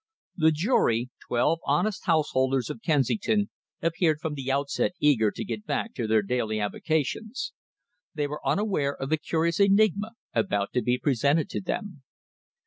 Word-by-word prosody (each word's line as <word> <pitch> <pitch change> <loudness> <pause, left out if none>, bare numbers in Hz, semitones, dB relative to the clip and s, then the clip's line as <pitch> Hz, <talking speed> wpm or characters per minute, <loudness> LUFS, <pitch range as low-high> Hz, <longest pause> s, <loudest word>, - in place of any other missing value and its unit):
The 160 -2 +4
jury 140 - +1 0.2
twelve 150 +7 +2
honest 190 +9 0
householders 135 -6 +2
of - - -8
Kensington 205 - +1 0.3
appeared 165 -2 +2
from 160 -1 -3
the 135 -2 -3
outset 140 +5 0
eager 125 -8 +4
to - - -6
get 210 +1 -5
back 225 - -2
to 115 -4 -3
their 110 -1 +3
daily 110 0 -1
avocations. 160 - -2 0.6
They 150 -1 0
were 150 +1 -5
unaware 190 -9 0
of 135 - -3
the 155 - +3
curious 165 +2 0
enigma 205 +2 +3 0.2
about 100 - 0
to 125 - +2
be 125 +1 +1
presented 145 +4 +1
to - - -3
them. 190 - -4
150 Hz, 150 wpm, -27 LUFS, 130-195 Hz, 0.6 s, The